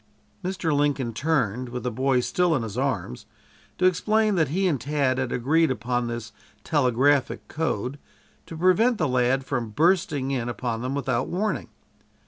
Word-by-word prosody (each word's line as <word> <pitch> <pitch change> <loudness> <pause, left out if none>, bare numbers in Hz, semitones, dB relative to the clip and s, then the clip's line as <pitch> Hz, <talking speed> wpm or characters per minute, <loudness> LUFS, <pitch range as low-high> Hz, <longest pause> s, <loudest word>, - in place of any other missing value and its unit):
Mr. 180 -4 -1
Lincoln 145 -4 0
turned, 125 -4 0
with 125 +1 -5
the 125 - -1
boy 130 +2 +1
still 175 +5 +1
in 125 - -1
his 110 -2 -6
arms, 120 - -2 0.5
to 185 - +1
explain 215 +4 +2
that 165 -5 +2
he 185 +7 0
and 145 -9 0
Tad 140 -1 0
had 130 -2 -2
agreed 155 +7 +2
upon 125 0 -1
this 120 -1 -5 0.3
telegraphic 140 -1 +2
code 140 -3 -2 0.5
to 165 - -8
prevent 200 +8 +3
the 155 - +1
lad 130 +1 +1
from 120 -4 -2
bursting 150 - +1
in 120 -3 -1
upon 120 -1 -3
them 130 +2 -2
without 130 -3 -1
warning. 210 +4 -2
135 Hz, 160 wpm, -25 LUFS, 125-160 Hz, 0.5 s, prevent